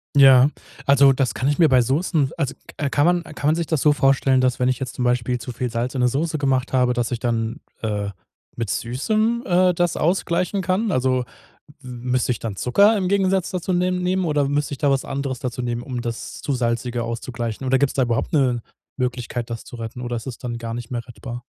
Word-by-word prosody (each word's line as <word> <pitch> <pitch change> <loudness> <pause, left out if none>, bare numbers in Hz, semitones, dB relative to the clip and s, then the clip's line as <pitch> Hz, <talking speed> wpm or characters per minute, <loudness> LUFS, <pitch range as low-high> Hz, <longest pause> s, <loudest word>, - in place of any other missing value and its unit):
Ja, 135 -1 +8 0.4
also, 140 -1 +6
das 130 -1 0
kann 130 - -1
ich 145 - +1
mir 165 -4 +5
bei 130 -1 +5
Soßen 145 +2 +1
also 140 -4 -1 0.2
k 145 - -1
kann 145 +2 +3
man 175 -1 +2
kann 150 -2 -4
man 155 - +4
sich 170 0 -1
das 160 -3 -1
so 150 - +5
vorstellen, 135 -2 +3
dass 130 0 +1
wenn 125 0 +2
ich 130 - 0
jetzt 130 -2 -4
zum 125 - -3
Beispiel 125 0 +1
zu 120 +2 -6
viel 120 0 -3
Salz 120 +3 -2
in 125 - 0
'ne 125 - +4
Soße 155 +5 -1
gemacht 135 -2 0
habe, 125 -1 +3
dass 120 -1 -1
ich 125 - -2
dann, 115 -1 -2 0.2
äh, 105 -2 -2 0.5
mit 115 -3 -3
Süßem, 215 - 0
äh, 180 0 +4
das 175 -1 0
ausgleichen 180 +2 0
kann? 190 +4 0
Also, 130 -2 +1 0.6
müsste 125 0 -1
ich 115 - -4
dann 105 -4 -5
Zucker 200 - +4
im 185 -2 0
Gegensatz 190 -2 +1
dazu 185 0 -2
nehm 180 0 +1
nehmen? 185 +1 +1
Oder 145 -3 +1
müsst 145 +1 0
ich 140 - -5
da 145 - +2
was 135 -1 +1
anderes 135 -2 -3
dazu 125 -1 -4
nehmen, 120 -1 -2
um 125 -2 -4
das 120 -1 -5
zu 145 - -2
Salzige 120 0 -1
auszugleichen? 115 +1 -4
Oder 130 +1 +3
gibt's 140 0 +2
da 135 - +1
überhaupt 120 +5 -1
'ne 125 -6 +2 0.3
Möglichkeit, 125 -2 -3
das 115 - -5
zu - - -10
retten? 115 +1 -6
Oder 120 -1 -3
ist 115 - -7
es 130 -3 -6
dann 120 -2 -5
gar 115 -1 -5
nicht 120 -1 -6
mehr 120 -1 -4
rettbar? 120 0 -8
130 Hz, 230 wpm, -22 LUFS, 120-150 Hz, 0.6 s, Ja